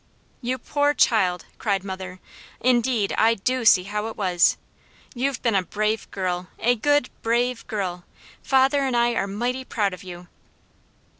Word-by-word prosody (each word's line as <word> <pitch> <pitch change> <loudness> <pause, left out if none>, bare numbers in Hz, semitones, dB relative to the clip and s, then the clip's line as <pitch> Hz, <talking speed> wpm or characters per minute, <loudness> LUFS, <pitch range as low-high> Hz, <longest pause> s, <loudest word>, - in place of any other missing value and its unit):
"You 255 +1 -2
poor 290 +2 0
child!" 185 -7 +2
cried 200 -4 0
mother. 185 -1 -7 0.4
"Indeed 240 -4 +1
I 225 +1 +4
DO 255 +4 -1
see 185 -5 +6
how 210 +3 -3
it 225 - -8
was. 180 -4 +3 0.6
You've 260 +1 -1
been 230 -3 +2
a 195 - +3
brave 215 +4 -2
girl. 180 -2 -3
A 240 +2 +2
good, 290 +3 +1
brave 240 +1 0
girl! 185 -5 -3 0.4
Father 270 +1 +3
and 260 -3 0
I 235 0 +3
are 200 - -1
mighty 245 +6 -2
proud 205 -6 -1
of 185 - -10
you!" 175 -1 -10
220 Hz, 155 wpm, -23 LUFS, 190-250 Hz, 0.6 s, see